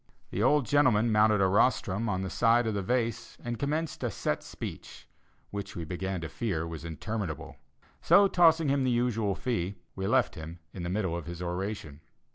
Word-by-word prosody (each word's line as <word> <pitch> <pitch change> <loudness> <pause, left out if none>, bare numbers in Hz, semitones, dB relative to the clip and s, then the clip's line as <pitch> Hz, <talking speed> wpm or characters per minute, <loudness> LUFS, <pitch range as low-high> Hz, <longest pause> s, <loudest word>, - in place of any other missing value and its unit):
The 100 - -2
old 140 +3 +4
gentleman 120 -4 +3
mounted 105 -1 +4
a - - +5
rostrum 105 +1 +2
at 95 -2 -1
the 95 - -3
side 120 0 +3
of 110 - 0
the 100 - -1
vase, 115 +2 -1
and 120 -1 -4
commenced 155 +2 -2
a - - +1
set - - -2
speech, - - -8 0.4
which 100 -1 -5
we 85 - -4
began 90 +2 -3
to 80 - -4
fear 85 -3 -2
was 80 -2 -7
interminable; 85 +1 -5 0.4
so 200 0 +6
tossing 165 -4 +4
him 140 -1 +2
the 130 - +2
usual 115 -5 +1
fee, 100 -6 -2 0.2
we 95 0 -2
left 125 0 +2
him 80 +2 -8 0.2
in 95 - -6
the 85 - -3
middle 95 -3 -1
of 85 -1 -6
his 85 0 -6
oration. 90 -4 -4
105 Hz, 190 wpm, -29 LUFS, 90-120 Hz, 0.4 s, so